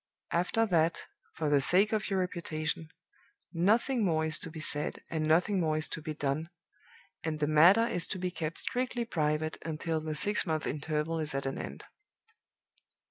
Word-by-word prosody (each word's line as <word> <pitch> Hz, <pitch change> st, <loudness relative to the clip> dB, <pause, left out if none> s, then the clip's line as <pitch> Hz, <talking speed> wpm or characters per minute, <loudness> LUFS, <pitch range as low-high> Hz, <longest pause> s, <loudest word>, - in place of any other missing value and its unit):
After 180 Hz, +6 st, +2 dB
that, 165 Hz, -5 st, +1 dB, 0.3 s
for 160 Hz, -, -2 dB
the 145 Hz, -1 st, +4 dB
sake 195 Hz, +9 st, +4 dB
of 215 Hz, -1 st, 0 dB
your 195 Hz, -, 0 dB
reputation, 160 Hz, -3 st, -3 dB, 0.6 s
nothing 220 Hz, +8 st, +2 dB
more 160 Hz, -4 st, +2 dB
is 155 Hz, -1 st, +2 dB
to -, -, 0 dB
be 160 Hz, 0 st, -8 dB
said, 150 Hz, -1 st, 0 dB
and 155 Hz, -1 st, -1 dB
nothing 180 Hz, +5 st, +3 dB
more 155 Hz, -3 st, +1 dB
is 155 Hz, -, -1 dB
to 165 Hz, -, -5 dB
be 155 Hz, 0 st, -5 dB
done, 145 Hz, +3 st, -2 dB, 0.7 s
and 160 Hz, -1 st, -2 dB
the 150 Hz, -, +1 dB
matter 170 Hz, +9 st, +6 dB
is 180 Hz, -7 st, -2 dB
to 190 Hz, -, -4 dB
be 180 Hz, 0 st, -2 dB
kept 165 Hz, -2 st, -4 dB
strictly 245 Hz, -1 st, -2 dB
private 155 Hz, -4 st, -1 dB
until 160 Hz, 0 st, -2 dB
the 155 Hz, -1 st, -4 dB
six 205 Hz, +7 st, +2 dB
months' 160 Hz, -4 st, -2 dB
interval 150 Hz, +2 st, -2 dB
is 155 Hz, -3 st, -2 dB
at 135 Hz, -, -2 dB
an 135 Hz, -, -3 dB
end. 70 Hz, -, -7 dB
160 Hz, 180 wpm, -30 LUFS, 155-180 Hz, 0.7 s, matter